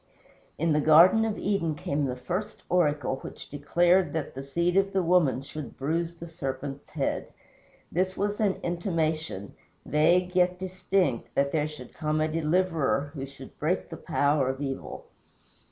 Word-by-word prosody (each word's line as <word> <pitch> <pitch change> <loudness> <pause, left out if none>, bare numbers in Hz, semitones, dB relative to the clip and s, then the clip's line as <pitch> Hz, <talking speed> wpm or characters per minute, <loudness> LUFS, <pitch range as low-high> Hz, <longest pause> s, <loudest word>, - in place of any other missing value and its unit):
In 165 0 +2
the 150 - +3
Garden 170 +9 +7
of 220 -2 -2
Eden 180 -6 0
came 145 0 -1
the 125 -2 -2
first 180 +11 -4
oracle, 150 -6 +1
which - - -10
declared 175 +4 +2
that 160 -3 -3
the 135 - -6
SEED 170 +6 0
of 195 0 +2
the 190 -1 +2
woman 165 -7 +3
should 150 +1 -8
bruise 165 +4 -1
the 170 - -9
serpent's 140 -3 -5
head. 145 -3 -2 0.6
This 185 +2 0
was 205 +1 -1
an 205 -3 +2
intimation, 160 - -2 0.3
vague 180 +4 +3
yet 180 0 +3
distinct, 185 -7 -1
that 140 0 +2
there 150 -2 +1
should 150 -5 -10
come 155 -1 -1
a 155 - +2
Deliverer 160 -3 +1
who 135 -3 -5
should 140 - -13
break - - 0
the - - -7
power 140 -2 +1
of 130 0 -3
evil. 135 -2 -5
160 Hz, 160 wpm, -27 LUFS, 140-180 Hz, 0.6 s, Garden